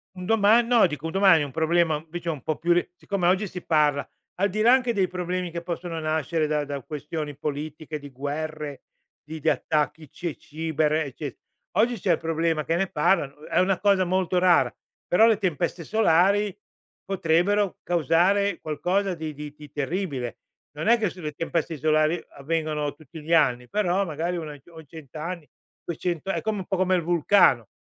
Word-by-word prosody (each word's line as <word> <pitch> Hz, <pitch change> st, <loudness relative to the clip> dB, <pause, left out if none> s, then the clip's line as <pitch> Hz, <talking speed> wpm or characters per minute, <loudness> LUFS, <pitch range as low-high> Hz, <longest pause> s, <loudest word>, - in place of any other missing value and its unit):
un 180 Hz, -1 st, -7 dB
doma 225 Hz, +1 st, +5 dB
no, 235 Hz, -3 st, +4 dB
dico, 150 Hz, -2 st, -4 dB
un 160 Hz, -, -4 dB
domani 190 Hz, -5 st, +5 dB
è -, -, 0 dB
un 140 Hz, -, -8 dB
problema, 160 Hz, 0 st, +1 dB
invece, 170 Hz, +1 st, -5 dB
ho -, -, +1 dB
un 140 Hz, -5 st, -10 dB
po' 155 Hz, -, -1 dB
più 170 Hz, +1 st, 0 dB
ri 175 Hz, -, +1 dB
siccome 185 Hz, -1 st, -1 dB
oggi 190 Hz, +3 st, +2 dB
si 180 Hz, 0 st, -8 dB
parla 150 Hz, -3 st, +2 dB, 0.3 s
al 200 Hz, +2 st, +1 dB
di 215 Hz, +3 st, -2 dB
là 235 Hz, -, +6 dB
anche 250 Hz, -2 st, +3 dB
dei 195 Hz, -3 st, +2 dB
problemi 180 Hz, 0 st, -3 dB
che 170 Hz, 0 st, -4 dB
possono 170 Hz, -1 st, -4 dB
nascere 155 Hz, +1 st, 0 dB
da 150 Hz, -1 st, 0 dB
da 140 Hz, -1 st, -5 dB
questioni 150 Hz, 0 st, -5 dB
politiche 150 Hz, +1 st, -5 dB
di 145 Hz, -1 st, -10 dB
guerre, 145 Hz, +1 st, -5 dB, 0.4 s
di 155 Hz, +2 st, -8 dB
di -, -, +1 dB
attacchi 155 Hz, 0 st, -1 dB
cie 170 Hz, -4 st, -5 dB
ciber, 155 Hz, 0 st, -1 dB
ecce 145 Hz, -2 st, -3 dB, 0.4 s
oggi 240 Hz, +2 st, +3 dB
c'è 180 Hz, -, +1 dB
il 165 Hz, -, +2 dB
problema 165 Hz, -1 st, 0 dB
che 165 Hz, -, 0 dB
ne 190 Hz, +2 st, +1 dB
parlano. 150 Hz, -2 st, 0 dB
È -, -, +1 dB
una 185 Hz, 0 st, +2 dB
cosa 195 Hz, -2 st, +3 dB
molto 185 Hz, 0 st, 0 dB
rara, 180 Hz, -1 st, +4 dB, 0.4 s
però 220 Hz, +5 st, +5 dB
le 225 Hz, -3 st, +4 dB
tempeste 175 Hz, -2 st, -1 dB
solari 200 Hz, +1 st, +3 dB, 0.5 s
potrebbero 195 Hz, +2 st, +1 dB
causare 175 Hz, +4 st, +2 dB
qualcosa 180 Hz, +5 st, -1 dB
di 155 Hz, -2 st, -5 dB
di 150 Hz, 0 st, -8 dB
di 150 Hz, -2 st, -12 dB
terribile. 145 Hz, -, -3 dB, 0.4 s
Non 155 Hz, +8 st, -3 dB
è 235 Hz, 0 st, +5 dB
che 210 Hz, -4 st, +1 dB
sulle 160 Hz, -5 st, -6 dB
tempeste 165 Hz, 0 st, -2 dB
solari 155 Hz, +3 st, +2 dB
avvengono 150 Hz, 0 st, -2 dB
tutti 160 Hz, +1 st, -12 dB
gli 165 Hz, -, -1 dB
anni, 125 Hz, -6 st, +3 dB
però, 200 Hz, -1 st, +1 dB
magari, 170 Hz, +2 st, -2 dB
una 155 Hz, -3 st, -5 dB
i 140 Hz, -, -14 dB
o 160 Hz, -1 st, -12 dB
100 150 Hz, -1 st, -13 dB
anni, 165 Hz, 0 st, -5 dB, 0.4 s
200, 170 Hz, +1 st, -3 dB
è -, -, -2 dB
come 215 Hz, -2 st, -2 dB
un 185 Hz, -, -5 dB
po' 190 Hz, 0 st, -2 dB
come 185 Hz, 0 st, +2 dB
il 180 Hz, -, +1 dB
vulcano. 170 Hz, -, +4 dB
165 Hz, 190 wpm, -25 LUFS, 150-185 Hz, 0.5 s, là